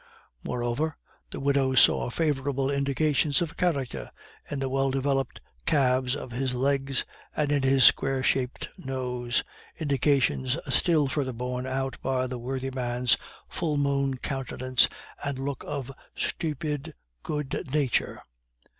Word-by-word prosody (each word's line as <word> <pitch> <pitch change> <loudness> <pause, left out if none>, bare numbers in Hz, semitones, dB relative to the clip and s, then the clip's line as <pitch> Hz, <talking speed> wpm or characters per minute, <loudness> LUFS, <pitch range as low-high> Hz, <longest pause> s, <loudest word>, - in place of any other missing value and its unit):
Moreover, 125 +6 -1 0.3
the - - -6
widow 135 -1 +2
saw 125 - +5
favorable 140 -2 0
indications 140 +1 +2
of 165 -2 -2
character 140 - -1 0.4
in 145 - -3
the 135 0 -1
well 135 +1 +1
developed 135 -1 0 0.3
calves 130 -2 +3
of 130 - -7
his 125 +1 -1
legs 135 +1 +1 0.3
and 150 -1 +1
in 145 -1 +3
his 135 0 +4
square 135 +1 +5
shaped 130 -1 0
nose, 125 -4 -2 0.4
indications 140 -2 +2 0.2
still 160 -5 +4
further 130 -1 -1
borne 125 +2 -3
out 135 0 -2
by 130 -1 0
the 125 -1 -4
worthy 130 +2 -3
man's 125 -1 +2 0.3
full 155 -4 -1
moon 140 -1 +1
countenance 130 -1 +1 0.3
and 140 -2 -2
look 135 -1 -3
of 135 -2 -4 0.2
stupid 150 -1 -2 0.3
good 150 - -3
nature. 145 -4 0
135 Hz, 130 wpm, -27 LUFS, 130-140 Hz, 0.4 s, saw